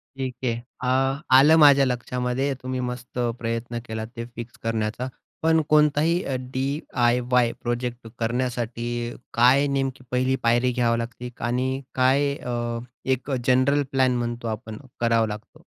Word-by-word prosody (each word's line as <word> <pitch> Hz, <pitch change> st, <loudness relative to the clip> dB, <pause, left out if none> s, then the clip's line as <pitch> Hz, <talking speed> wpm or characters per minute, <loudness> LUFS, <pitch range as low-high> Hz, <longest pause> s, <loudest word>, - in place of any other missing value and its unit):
ठीक 130 Hz, -2 st, -4 dB
आहे. 120 Hz, -2 st, +1 dB, 0.3 s
अ, 135 Hz, +2 st, +1 dB, 0.2 s
आलं 150 Hz, +4 st, +7 dB
माझ्या 140 Hz, -2 st, +7 dB
लक्षामध्ये. 125 Hz, +2 st, -1 dB
तुम्ही 130 Hz, 0 st, -3 dB
मस्त 125 Hz, 0 st, -5 dB, 0.2 s
प्रयत्न 115 Hz, +1 st, -3 dB
केला 110 Hz, 0 st, -4 dB
ते 115 Hz, 0 st, -5 dB
फिक्स 120 Hz, 0 st, -8 dB
करण्याचा, 115 Hz, +2 st, -2 dB, 0.4 s
पण 160 Hz, 0 st, +4 dB
कोणताही 150 Hz, +3 st, +3 dB
अ, 135 Hz, -, -2 dB, 0.2 s
डी-आय-वाय 125 Hz, -3 st, +1 dB
प्रोजेक्ट 120 Hz, 0 st, -3 dB
करण्यासाठी 120 Hz, 0 st, -2 dB, 0.5 s
काय 130 Hz, +4 st, +5 dB
नेमकी 135 Hz, -2 st, -2 dB
पहिली 130 Hz, +1 st, +2 dB
पायरी 120 Hz, +2 st, +3 dB
घ्यावी 120 Hz, -1 st, +1 dB
लागते 120 Hz, +1 st, -5 dB, 0.2 s
आणि 130 Hz, +2 st, -1 dB
काय 135 Hz, +2 st, +3 dB
अ, 120 Hz, -2 st, -3 dB, 0.3 s
एक 130 Hz, +1 st, -1 dB
अ, -, -, +2 dB
जनरल 130 Hz, +3 st, +4 dB
प्लॅन 130 Hz, -2 st, +3 dB
म्हणतो 120 Hz, 0 st, -3 dB
आपण, 110 Hz, 0 st, -5 dB, 0.2 s
करावा 115 Hz, -1 st, +2 dB
लागतो? 105 Hz, +1 st, -9 dB
125 Hz, 135 wpm, -24 LUFS, 120-135 Hz, 0.5 s, आलं